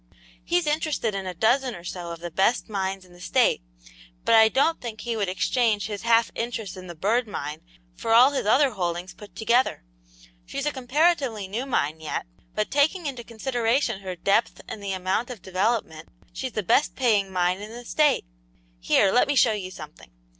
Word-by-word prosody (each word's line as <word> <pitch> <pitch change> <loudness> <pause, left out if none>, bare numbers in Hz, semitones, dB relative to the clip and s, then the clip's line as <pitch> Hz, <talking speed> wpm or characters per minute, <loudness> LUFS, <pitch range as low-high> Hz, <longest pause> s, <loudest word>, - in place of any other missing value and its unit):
He's 350 -1 +1
interested 300 -7 0
in 195 -1 -4
a 180 - -5
dozen 245 +6 +2
or 170 - -11
so 175 -1 -6
of 170 0 -7
the 175 0 -6
best 195 +8 +1
mines 195 -3 -3
in 180 - -19
the 175 - -16
State, - - +2 0.6
but - - +3
I 220 -1 +7
don't 300 +7 +1
think 230 -3 -6
he 235 -1 -3
would 205 -4 -1
exchange 215 +2 +1
his 205 -1 -5
half 230 0 +3
interest 230 -4 -4
in 185 -1 -10
the 175 - -8
Bird 220 +8 +1
Mine 150 -7 -5 0.3
for 145 - -4
all 245 +5 +7
his 275 -7 -2
other 270 +5 +4
holdings 175 -2 -3
put 205 -3 -14
together. 235 - +1 0.6
She's 275 - -5
a 295 - +1
comparatively 265 - +1
new 230 +8 -4
mine 160 - 0
yet, 160 - -4 0.3
but 215 - -1
taking 310 +5 +2
into 260 -4 -4
consideration 235 0 -1
her 185 -2 -5
depth 200 +6 +1
and 210 - -7
the 200 -1 -4
amount 190 +6 -1
of 230 -7 -8
development, 190 -4 -1 0.2
she's 260 -2 -5
the 215 - -2
best 285 +10 +2
paying 210 -7 +2
mine 180 +1 0
in 210 - -7
the 240 +2 -10
State. 300 - +2 0.5
Here, 125 - +3
let 250 +7 +4
me 290 - 0
show 245 -3 +5
you 195 -3 -4
something." - - -11
220 Hz, 195 wpm, -25 LUFS, 185-250 Hz, 0.6 s, I